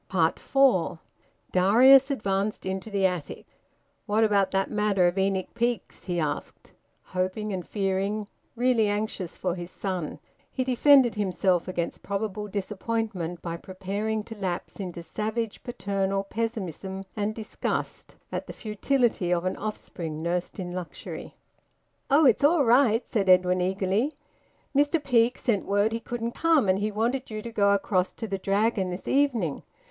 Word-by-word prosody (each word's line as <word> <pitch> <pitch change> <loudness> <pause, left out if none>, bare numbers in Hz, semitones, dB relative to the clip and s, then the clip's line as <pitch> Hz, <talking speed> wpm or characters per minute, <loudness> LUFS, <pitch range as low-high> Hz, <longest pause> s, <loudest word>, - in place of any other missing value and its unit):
FOUR. 185 +3 +2 0.5
Darius 255 +9 +6
advanced 205 -5 -1
into 190 +3 -3
the 200 -2 +1
attic. 180 -6 -2 0.6
"What 215 +2 +3
about 200 -3 +3
that 195 0 0
matter 210 -3 +2
of 175 +1 +2
Enoch 190 -1 0
Peake's?" 235 -1 -2
he 175 -2 -1
asked, 150 -2 -4 0.3
hoping 185 +3 -2
and 185 -2 -4
fearing, 200 +1 -1 0.3
really 240 -2 +3
anxious 205 -4 -3
for 180 -2 -1
his 175 -1 -6
son. 185 -5 -4 0.3
He 260 - -2
defended 260 0 +5
himself 185 -3 +1
against 175 -2 -3
probable 210 +1 -3
disappointment 200 -3 -3
by 170 -1 -3
preparing 200 +4 -3
to 225 +1 -9
lapse 185 -2 -4
into 180 -3 -5
savage 220 +4 -3
paternal 195 -4 -1
pessimism 195 -3 -4
and 210 0 -1
disgust 220 -2 -4 0.2
at - - -4
the - - -7
futility 220 -3 0
of 175 0 +1
an 185 - 0
offspring 175 -7 -5
nursed 175 +2 -2
in 180 -1 -4
luxury. 180 -1 -7 0.7
"Oh! 290 +3 +5
It's 250 0 +4
all 295 -1 +5
right," 235 -1 +4
said 195 -4 0
Edwin 180 0 +5
eagerly. 195 +9 0 0.6
"Mr 290 +4 +3
Peake 240 -2 +3
sent 225 -6 0
word 205 +2 +2
he 230 - -2
couldn't 235 0 -4
come, 320 -9 +3
and 185 +1 +3
he 210 +1 0
wanted 235 +5 -1
you 215 -1 -5
to 235 - -6
go 200 -2 +3
across 190 -2 0
to 225 - -6
the 195 -2 -3
Dragon 200 0 +1
this 180 +1 -6
evening. 245 - +1
205 Hz, 150 wpm, -27 LUFS, 185-230 Hz, 0.7 s, Darius